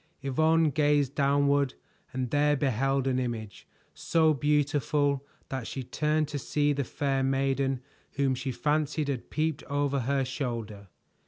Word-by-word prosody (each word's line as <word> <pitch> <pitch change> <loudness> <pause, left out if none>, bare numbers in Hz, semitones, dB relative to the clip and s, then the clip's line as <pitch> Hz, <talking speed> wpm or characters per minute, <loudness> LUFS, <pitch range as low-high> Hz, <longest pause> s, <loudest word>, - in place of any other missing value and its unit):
Yvonne 160 +3 +3
gazed 145 -1 +2
downward 140 -1 +2 0.4
and 130 -2 -3
there 145 0 +3
beheld 135 0 +1
an 130 -1 +1
image, 115 -4 -5 0.3
so 160 -2 +2
beautiful 145 0 +1 0.3
that 130 -4 -4
she 135 - -5
turned 150 +4 0
to 145 -1 -4
see 145 +1 +1
the 140 0 -1
fair 135 +1 -1
maiden 135 0 0 0.3
whom 140 -2 +1
she 130 +1 -3
fancied 150 +1 0
had 130 -4 -4
peeped 155 -1 -1
over 145 -1 0
her 135 +2 0
shoulder. 115 -7 -4
140 Hz, 140 wpm, -28 LUFS, 130-145 Hz, 0.4 s, Yvonne